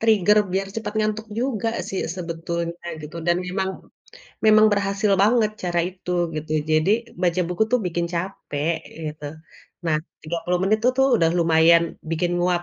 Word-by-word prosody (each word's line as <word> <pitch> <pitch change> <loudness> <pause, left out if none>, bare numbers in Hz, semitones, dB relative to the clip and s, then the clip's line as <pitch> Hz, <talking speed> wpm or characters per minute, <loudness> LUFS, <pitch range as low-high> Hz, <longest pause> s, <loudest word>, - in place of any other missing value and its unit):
trigger 210 -2 +4
biar 195 +1 0
cepet 225 -1 -3
ngantuk 215 +1 -1
juga 235 -3 -1 0.2
sih 195 - -2 0.2
sebetulnya 170 0 -4 0.2
gitu 155 +3 -8
dan 175 0 +3
memang 190 +1 -1 0.8
memang 215 0 +7
berhasil 200 +1 +1
banget 220 0 +3
cara 175 -1 +1
itu, 185 -1 -9 0.2
gitu. 155 0 -5 0.2
Jadi 155 +4 +3 0.3
baca 180 0 +2
buku 180 +4 0
tuh 250 - +4
bikin 170 0 -1
capek 170 -3 -2 0.3
gitu. 150 -1 -6 0.6
Nah, 155 - +2 0.3
30 170 +2 -2
menit 215 +3 +3
tuh 250 - +6
tuh 265 - +5
udah 165 -1 +3
lumayan 165 0 +5 0.3
bikin 175 +2 0
nguap. 175 0 +1
180 Hz, 150 wpm, -23 LUFS, 170-210 Hz, 0.8 s, memang